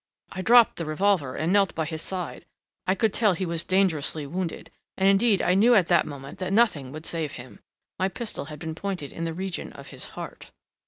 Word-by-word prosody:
I 185 - -4
dropped 235 +3 +6
the 165 - -3
revolver 155 -4 +1
and 165 +4 0
knelt 200 -2 +3
by 160 - -1
his 160 0 -5
side. 180 -2 -5 0.4
I 185 - +3
could 220 -1 +1
tell 210 -4 +3
he 185 +2 -2
was 170 -1 -2
dangerously 165 -6 +1
wounded, 170 +3 -4 0.3
and 190 - +3
indeed 195 +1 +4
I 180 - +3
knew 230 +6 +5
at 190 -5 +5
that 175 - +4
moment 140 -2 -9
that 185 0 -3
nothing 195 - +2
would 155 +2 -8
save 160 -4 -2
him. 120 +1 -10 0.4
My 190 +1 +2
pistol 215 - -5
had 150 0 -8
been 160 +1 -5
pointed 175 -4 -4
in 165 - -4
the 165 - -2
region 190 0 -4
of - - -11
his - - -7
heart...." - - -8
180 Hz, 215 wpm, -26 LUFS, 155-195 Hz, 0.4 s, dropped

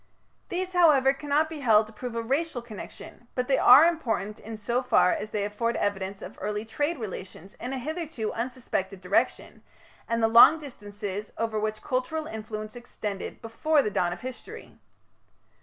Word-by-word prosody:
These, 370 +1 -3
however, 295 -7 +5
cannot 290 +2 +1
be 315 -1 -7
held 220 -5 +5
to 215 - -15
prove 235 +2 -6
a 230 - -2
racial 270 +1 -1
connection, 235 +1 -10
but 250 -1 -1
they 270 - +3
are 270 +6 +9
important 230 - -1
in 225 0 -8
so 235 +4 -1
far 250 -7 +4
as 215 - -4
they 205 -2 -1
afford 230 +3 -1
evidence 195 -1 -2
of - - -10
early 210 +1 -2
trade 290 +8 -1
relations 195 -4 -8
in 250 - -5
a 270 - -2
hitherto 305 -4 -4
unsuspected 230 -6 -3
direction, 185 +1 0 0.5
and 230 -1 0
the - - +6
long 235 +8 +8
distances 205 -7 -7
over 225 -1 -1
which 215 0 -3
cultural 260 +5 -2
influence 215 -3 -6
extended 215 -5 -6
before 285 +6 +2
the 210 - -2
dawn 175 -3 +1
of 175 - -6
history. 260 - -9
230 Hz, 170 wpm, -27 LUFS, 210-275 Hz, 0.5 s, are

